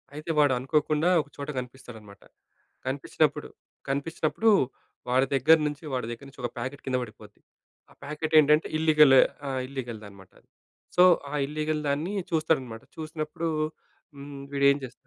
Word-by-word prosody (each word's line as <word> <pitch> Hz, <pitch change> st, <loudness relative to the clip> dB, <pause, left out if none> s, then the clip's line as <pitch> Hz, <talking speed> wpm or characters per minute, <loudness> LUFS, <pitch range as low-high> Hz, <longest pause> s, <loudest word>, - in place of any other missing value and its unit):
అయితే 155 Hz, +2 st, -4 dB
వాడనుకోకుండా 150 Hz, +4 st, +2 dB
ఒక 145 Hz, -, -14 dB
చోట 140 Hz, 0 st, -6 dB
కనిపిస్తాడన్నమాట. 120 Hz, -5 st, -11 dB, 0.7 s
కనిపిచినప్పుడు, 145 Hz, +2 st, -1 dB, 0.4 s
కనిపిచినప్పుడు 160 Hz, +9 st, 0 dB, 0.6 s
వాడి 130 Hz, +2 st, +3 dB
దగ్గర్నుంచి 150 Hz, +1 st, +3 dB
వాడి 125 Hz, -3 st, -2 dB
దగ్గర 120 Hz, +4 st, -8 dB
నుంచి 135 Hz, -, -14 dB
ఒక 120 Hz, -, -1 dB
ప్యాకెట్ 130 Hz, +4 st, -5 dB
కింద 130 Hz, -1 st, 0 dB
పడిపోద్ది. 105 Hz, -2 st, -13 dB, 0.5 s
ఆ -, -, -18 dB
ప్యాకెట్ 155 Hz, +2 st, -4 dB
ఏంటంటే 150 Hz, +1 st, +4 dB
ఇల్లిగల్ 155 Hz, -3 st, +6 dB, 0.3 s
ఆ! -, -, -2 dB, 0.2 s
ఇల్లిగల్‌ది 120 Hz, -5 st, -6 dB
అనమాట. 95 Hz, -2 st, -16 dB, 0.6 s
సో, 180 Hz, -, +7 dB, 0.3 s
ఆ -, -, -6 dB
ఇల్లీగల్ 155 Hz, +1 st, -2 dB
దాన్ని 155 Hz, +8 st, -1 dB, 0.2 s
చూస్తాడన్నమాట. 135 Hz, -8 st, 0 dB
చూసినప్పుడు 155 Hz, +1 st, -4 dB, 0.7 s
హ్మ్. 140 Hz, 0 st, -9 dB
వీడు 140 Hz, 0 st, +1 dB
ఏం 140 Hz, -, 0 dB
చేస్తాడు 130 Hz, -, -7 dB
140 Hz, 130 wpm, -27 LUFS, 130-155 Hz, 0.7 s, సో